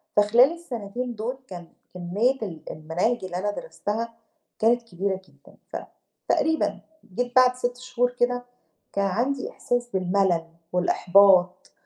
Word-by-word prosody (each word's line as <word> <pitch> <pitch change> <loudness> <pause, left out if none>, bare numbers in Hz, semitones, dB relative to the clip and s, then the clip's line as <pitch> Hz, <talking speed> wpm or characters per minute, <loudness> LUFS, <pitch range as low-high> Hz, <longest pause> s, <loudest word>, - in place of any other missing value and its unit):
فخلال 235 +9 +5
السَنتين 245 -6 -5
دُول 235 +5 -3
كان 175 -3 -9 0.3
كمّية 205 +9 0
ال 170 -8 -6
المناهج 180 +9 -1
اللي 180 -1 -4
أنا 205 +2 -1
درستها 230 - -4 0.5
كانت 235 +2 +4
كبيرة 190 -2 -3
جدًا. - - -11 0.4
فتقريبًا 320 0 +1 0.3
جيت 245 +1 -2
بعد 255 0 +6
6 245 0 -2
شهور 250 -1 0
كده، 245 0 0 0.5
كان 200 0 +1
عندي 250 +8 -1
إحساس 245 0 -2
بالمَلَل 185 -2 +1 0.3
والإحباط، 185 0 +4
220 Hz, 120 wpm, -25 LUFS, 185-245 Hz, 0.5 s, بعد